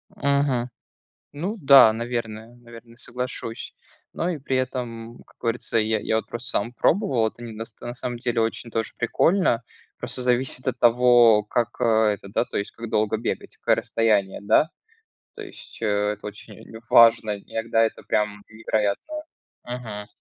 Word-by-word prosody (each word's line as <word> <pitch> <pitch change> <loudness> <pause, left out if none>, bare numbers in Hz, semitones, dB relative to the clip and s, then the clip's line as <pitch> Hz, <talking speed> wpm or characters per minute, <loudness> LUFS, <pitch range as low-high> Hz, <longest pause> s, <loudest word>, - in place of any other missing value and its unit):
Мгм. 140 -3 +1 0.6
Ну 175 +10 -4
да, 135 -6 +8
наверное 115 -1 -5
наверное, 115 -1 -15
соглашусь. 125 -2 -6 0.4
Но 170 - -1
и 175 -4 -2
при 135 -1 -2
этом, 120 -3 -4
как - - -25
говорится, 115 0 -1
я 110 0 +1
я 110 - 0
вот 110 - -2
просто 120 +1 -6
сам 115 +4 -1
пробовал, 130 - +2
это 120 - -14
не 115 -1 -7
до 110 - -5 0.2
на 120 0 -6
самом 125 -1 -5
деле 120 -1 -1
очень 115 +1 -2
тоже 115 -1 -2
прикольно, 125 +1 +2 0.4
просто - - -5
зависит 125 +2 0
от 130 - -2
того, 120 -2 +5
как, 120 +2 -1
э, - - +2 0.3
это 100 - -12
да, 100 - 0
то - - -7
есть 100 - -4
как 115 -1 -8
долго 110 +1 +1
бегать, 115 - -4
какое - - +2
расстояние, 105 -4 0
да, 125 +9 +3 0.7
то - - -9
есть, - - -12
э, - - -1 0.3
это 105 - -13
очень 105 +1 -10 0.3
важно, 115 -2 +5
иногда 115 +2 0
это 110 - -2
прям 105 -1 -1
невероятно. 110 - -2 0.5
Мгм. 115 -4 -6
115 Hz, 160 wpm, -24 LUFS, 110-125 Hz, 0.7 s, да